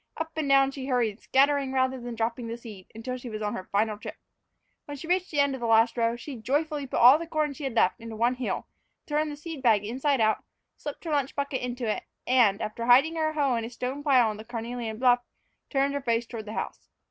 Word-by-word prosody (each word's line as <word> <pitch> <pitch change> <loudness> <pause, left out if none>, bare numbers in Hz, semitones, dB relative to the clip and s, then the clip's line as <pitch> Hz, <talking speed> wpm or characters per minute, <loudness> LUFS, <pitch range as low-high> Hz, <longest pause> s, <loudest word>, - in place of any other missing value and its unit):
Up 320 0 -3
and 310 -3 -1
down 275 0 +5
she 270 -1 -6
hurried, 240 -5 0
scattering 275 0 +2
rather 260 -1 +1
than 240 -1 -6
dropping 230 +1 -2
the 230 +1 -5
seed, 210 -6 -11
until 250 +3 -4
she 250 -1 -8
was 215 -1 -5
on 210 - -1
her 185 - -5
final 210 +1 +1
trip. - - -8 0.7
When 290 -1 -7
she 275 - -8
reached 365 +2 0
the 295 - -2
end 280 -1 +3
of 265 - -6
the 235 - -1
last 225 +1 +4
row, 230 -1 +1
she 255 +2 -8
joyfully 290 +5 -1
put - - -3
all 255 +5 +8
the 335 - -6
corn 305 -3 0
she 280 +1 -7
had 260 -4 -3
left 205 +1 +2
into 230 -1 -7
one 235 +3 +2
hill, 255 -1 -3 0.4
turned 300 0 0
the - - -6
seed 300 -1 -7
bag 220 -5 +3
inside 265 +5 0
out, 215 -1 +2 0.3
slipped 290 - -7
her 330 - -4
lunch 285 -2 0
bucket 280 -2 -2
into 245 0 -3
it, 215 - -1 0.2
and, 235 -6 +3
after 230 +2 -4
hiding 275 +7 +6
her 310 -1 0
hoe 285 -4 +1
in 230 - -1
the 225 - -5
stone 255 +3 -4
pile 265 -5 +4
on 215 -1 -3
the 215 - -8
carnelian 230 -1 -5
bluff, 245 0 +4 0.5
turned 275 0 +1
her 285 - -2
face 235 -2 0
toward 230 -2 -7
the 215 - -7
house. - - -5
250 Hz, 245 wpm, -27 LUFS, 230-280 Hz, 0.7 s, all